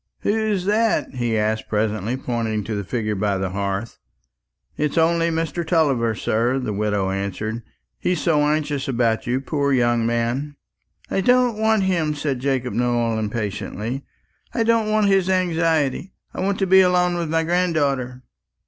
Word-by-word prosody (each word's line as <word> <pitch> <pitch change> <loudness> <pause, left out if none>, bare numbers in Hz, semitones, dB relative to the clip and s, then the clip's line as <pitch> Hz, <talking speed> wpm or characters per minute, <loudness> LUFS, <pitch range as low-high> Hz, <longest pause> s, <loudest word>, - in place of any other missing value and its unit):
"Who's 210 -3 0
that?" 215 -2 +1
he 120 -3 -1
asked 110 +1 -1
presently, 110 +2 -1
pointing 115 -4 -2
to 110 - -4
the 100 -1 -2
figure 110 +1 -2
by 100 -1 0
the 95 -1 -2
hearth. 100 +3 -3 0.8
"It's 150 +1 -1
only 165 +1 +3
Mr. 165 +1 -2
Tulliver, 140 -9 +1
sir," 115 +5 0
the 125 -5 -2
widow 100 -2 0
answered. 100 +4 -3 0.4
"He's 180 -2 0
so 155 -2 +2
anxious 150 -2 0
about 120 -4 0
you, 125 +2 +1
poor 140 0 -1
young 120 -2 +2
man." 120 +5 -1 0.6
"I 195 - +1
don't 250 +2 +3
want 220 -2 +3
him," 165 -5 0
said 145 -3 -2
Jacob 130 -1 -1
Nowell 120 -2 0
impatiently. 110 +3 -4 0.5
"I 230 - +2
don't 225 -1 +2
want 215 -1 +2
his 195 -2 +3
anxiety; 165 -3 0 0.2
I - - -7
want 195 +1 0
to 195 - +1
be 190 +1 +6
alone 180 -1 +3
with 170 -2 -2
my 165 +1 +1
granddaughter." 145 -8 0
135 Hz, 155 wpm, -22 LUFS, 115-175 Hz, 0.8 s, be